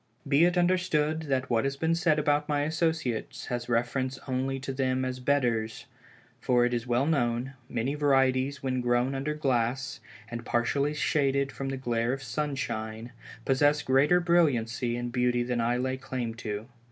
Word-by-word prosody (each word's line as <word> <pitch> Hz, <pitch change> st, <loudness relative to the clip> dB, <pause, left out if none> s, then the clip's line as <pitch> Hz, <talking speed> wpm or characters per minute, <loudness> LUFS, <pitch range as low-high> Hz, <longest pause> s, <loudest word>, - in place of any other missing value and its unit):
Be 140 Hz, +4 st, +5 dB
it 175 Hz, +1 st, +1 dB
understood 160 Hz, -4 st, +1 dB
that 130 Hz, -2 st, 0 dB
what 115 Hz, -1 st, +2 dB
has 135 Hz, 0 st, -2 dB
been 160 Hz, +3 st, +1 dB
said 170 Hz, -2 st, +2 dB
about 150 Hz, 0 st, +1 dB
my 145 Hz, -1 st, +1 dB
associates 155 Hz, -7 st, -1 dB
has 120 Hz, 0 st, -3 dB
reference 130 Hz, +3 st, 0 dB
only 135 Hz, +1 st, -1 dB
to 135 Hz, 0 st, -4 dB
them 130 Hz, -1 st, 0 dB
as 130 Hz, 0 st, -3 dB
bedders; 120 Hz, -5 st, 0 dB, 0.5 s
for 120 Hz, -1 st, +3 dB
it 120 Hz, -, 0 dB
is 120 Hz, 0 st, -2 dB
well 120 Hz, +3 st, +2 dB
known, 125 Hz, -4 st, 0 dB, 0.2 s
many 120 Hz, +3 st, -1 dB
varieties 135 Hz, -1 st, +2 dB
when 130 Hz, -1 st, 0 dB
grown 120 Hz, +2 st, +1 dB
under 140 Hz, +3 st, -2 dB
glass, 130 Hz, -3 st, -1 dB, 0.3 s
and 115 Hz, 0 st, -6 dB
partially 140 Hz, +6 st, 0 dB
shaded 140 Hz, -2 st, +1 dB
from 135 Hz, 0 st, -5 dB
the 135 Hz, -, -3 dB
glare 120 Hz, -1 st, 0 dB
of 135 Hz, 0 st, -5 dB
sunshine, 120 Hz, -4 st, -3 dB, 0.3 s
possess 145 Hz, +2 st, +3 dB
greater 140 Hz, +7 st, +4 dB
brilliancy 125 Hz, -9 st, +1 dB
and 120 Hz, 0 st, -4 dB
beauty 125 Hz, 0 st, +1 dB
than 120 Hz, -1 st, -1 dB
I 120 Hz, +1 st, +1 dB
lay 130 Hz, +1 st, -1 dB
claim 130 Hz, -3 st, -4 dB
to. 110 Hz, -2 st, -5 dB
130 Hz, 165 wpm, -28 LUFS, 120-145 Hz, 0.5 s, Be